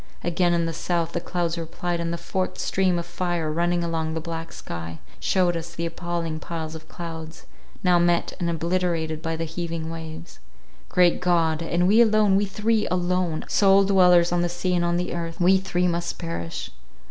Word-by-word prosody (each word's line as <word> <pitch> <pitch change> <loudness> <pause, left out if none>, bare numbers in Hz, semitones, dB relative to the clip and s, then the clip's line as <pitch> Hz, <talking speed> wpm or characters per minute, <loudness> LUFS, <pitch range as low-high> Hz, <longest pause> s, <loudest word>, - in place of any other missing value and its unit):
Again 175 0 +2
in 170 -1 +1
the 165 - -2
south, 170 0 -1
the 170 - -2
clouds 170 -1 -2
replied, 170 +1 -3
and 170 0 -2
the 170 - -2
forked 185 +2 -3
stream 185 -2 +1
of 170 - -3
fire 175 -2 -2
running 175 +2 +1
along 160 -1 -2
the - - -1
black 165 0 -6
sky, 80 -1 -7 0.2
shewed 180 -2 +2
us 170 0 -6
the 170 - -2
appalling 170 -1 -3
piles 160 -1 -5
of 160 0 -10
clouds, 160 -2 -8 0.4
now 180 -2 +4
met 175 0 +2
and 170 - 0
obliterated 165 -1 -1
by 165 0 -2
the 165 - -3
heaving 165 0 -4
waves. 160 - -8 0.5
Great 180 -1 +3
God! 165 -3 +2
And 175 +2 +1
we 215 +4 +6
alone—we 210 -3 +4
three— 215 +2 +1
alone—alone—sole 180 +2 +2
dwellers 180 -3 +5
on 175 0 +2
the 175 - 0
sea 175 +1 -1
and 175 -1 +2
on 170 0 +1
the 180 0 -2
earth, 165 -1 -4
we 185 +2 +5
three 180 -1 0
must 170 0 -2
perish! 85 0 -5
170 Hz, 180 wpm, -24 LUFS, 165-180 Hz, 0.5 s, we